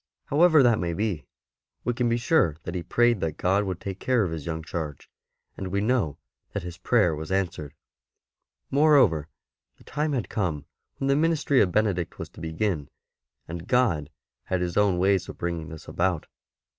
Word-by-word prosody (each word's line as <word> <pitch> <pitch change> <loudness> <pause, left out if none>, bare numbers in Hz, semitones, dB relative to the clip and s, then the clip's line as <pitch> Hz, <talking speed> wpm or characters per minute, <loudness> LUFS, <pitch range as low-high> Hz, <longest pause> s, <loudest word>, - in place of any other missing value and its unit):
However 155 0 +5
that 120 -3 +4
may 85 -1 -1
be, 100 -7 -2 0.6
we 120 - 0
can 120 0 0
be 115 - +2
sure 115 - +2
that 85 - -5
he 90 - -2
prayed 120 +5 +2
that 80 -2 -1
God 95 +3 +2
would 95 -2 -3
take 95 -1 -6
care 125 -4 +2
of 90 - -2
his 80 -2 -5
young 80 -1 -3
charge; 80 -4 -6 0.4
and 95 - -5
we 100 +2 -1
know 105 - +1 0.2
' - - -52
that - - -3
his 85 -1 -8
prayer 100 -4 +3
was 80 +4 -6
answered. 85 -6 -2 1.0
Moreover, 135 - +4 0.5
the - - -19
time 150 0 -2
had 120 -9 -1
come 85 -10 -2 0.3
when 135 - -2
the 140 - +4
ministry 150 -3 +3
of 95 - +2
Benedict 95 -4 0
was - - -6
to - - -13
begin, 80 -2 -2 0.6
and 85 +2 -7
God 110 - +2 0.4
had 95 - -1
His 90 -1 -2
own 100 -3 +3
ways 95 0 +2
of - - -8
bringing 85 -2 -3
this 80 -1 -10
about. 90 -2 0
95 Hz, 185 wpm, -26 LUFS, 80-120 Hz, 1.0 s, However